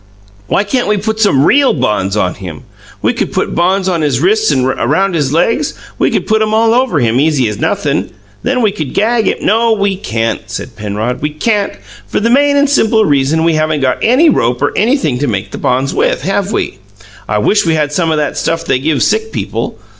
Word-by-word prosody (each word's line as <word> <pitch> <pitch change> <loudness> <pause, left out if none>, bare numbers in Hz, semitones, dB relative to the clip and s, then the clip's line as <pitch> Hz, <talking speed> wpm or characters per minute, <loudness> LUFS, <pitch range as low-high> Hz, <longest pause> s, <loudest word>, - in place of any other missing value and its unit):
"Why 200 - +1
can't 245 +5 -1
we 210 0 +1
put 220 +2 -3
some 155 -11 +3
REAL 280 0 +4
bonds 105 -6 -1
on 90 -3 0
him? 90 -6 -9 0.4
We - - +2
could - - -3
put - - -2
bonds 185 +2 +1
on 175 -3 0
his 140 -5 0
wrists 215 +7 +2
and 130 -3 +1
around 155 +9 0
his 145 -5 0
legs 205 - 0 0.2
we - - +2
could - - -1
put 220 0 +1
'em 215 0 +1
all 225 0 +3
over 245 - +1
him, 120 0 +1
easy 145 -4 +2
as 105 -1 -4
nothin'. - - -1 0.3
Then 250 -1 0
we 215 - +3
could 155 -8 -6
gag 225 +2 +1
him - - +1
" - - -14
"No, 225 +2 +3
we 200 -2 0
can't," 115 - -2
said 110 +4 -6
Penrod. 105 +3 -3
"We 150 - -1
can't, 200 +7 -1 0.3
for - - -1
the 230 +2 +1
main 285 +2 +3
and 285 +1 +3
simple 225 -6 +2
reason 145 +2 +1
we 165 0 +2
haven't 155 -1 0
got 130 -1 0
any 260 +9 +4
rope 125 - +1
or 145 - 0
anything 215 - +1
to 145 - -1
make 100 -3 -3
the - - -6
bonds 130 +2 0
with, - - 0
have 195 +1 -1
we? - - -3 0.5
I - - +1
wish 205 -4 +2
we 160 - +2
had 150 -1 -1
some 165 0 0
o' 160 - +1
that 150 -1 -2
stuff 165 0 -2
they 130 - +1
give 150 +1 0
sick 220 +1 0
people. - - -4
165 Hz, 225 wpm, -13 LUFS, 130-220 Hz, 0.5 s, REAL